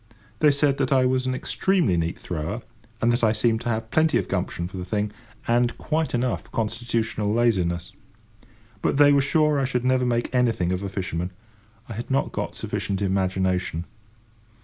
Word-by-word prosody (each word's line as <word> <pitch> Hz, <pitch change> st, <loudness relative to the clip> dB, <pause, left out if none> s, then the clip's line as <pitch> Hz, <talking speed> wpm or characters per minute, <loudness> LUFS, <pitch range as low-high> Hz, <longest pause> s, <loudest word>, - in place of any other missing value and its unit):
They 150 Hz, -, +6 dB
said 140 Hz, -1 st, +2 dB
that 135 Hz, -1 st, 0 dB
I 130 Hz, -2 st, +4 dB
was 130 Hz, 0 st, +1 dB
an 130 Hz, -, 0 dB
extremely 180 Hz, -, +1 dB
neat 85 Hz, 0 st, -1 dB
thrower, 90 Hz, +8 st, -4 dB, 0.4 s
and 120 Hz, +1 st, +4 dB
that 120 Hz, -, -1 dB
I 110 Hz, -1 st, +4 dB
seemed 110 Hz, +1 st, +1 dB
to 120 Hz, -, -3 dB
have 110 Hz, -1 st, -2 dB
plenty 160 Hz, 0 st, +3 dB
of -, -, -1 dB
gumption 90 Hz, -2 st, -2 dB
for 95 Hz, -, -9 dB
the 90 Hz, -, -4 dB
thing, 105 Hz, +3 st, -1 dB, 0.4 s
and 120 Hz, 0 st, +2 dB
quite 155 Hz, -3 st, -1 dB
enough 125 Hz, 0 st, -2 dB
constitutional 115 Hz, -1 st, -1 dB
laziness. 90 Hz, -7 st, +1 dB, 0.9 s
But -, -, +1 dB
they 145 Hz, 0 st, +7 dB
were 140 Hz, -, +5 dB
sure 150 Hz, +1 st, +2 dB
I 135 Hz, -, +1 dB
should 125 Hz, -1 st, -1 dB
never 130 Hz, 0 st, +3 dB
make 120 Hz, +1 st, -1 dB
anything 115 Hz, -8 st, +2 dB
of 90 Hz, 0 st, -1 dB
a 100 Hz, -, -3 dB
fisherman. 90 Hz, -2 st, -3 dB, 0.6 s
I 115 Hz, -, -6 dB
had 115 Hz, +3 st, -6 dB
not 135 Hz, +1 st, +1 dB
got -, -, -4 dB
sufficient 95 Hz, -1 st, -3 dB
imagination. 95 Hz, -3 st, 0 dB
115 Hz, 180 wpm, -24 LUFS, 95-130 Hz, 0.9 s, they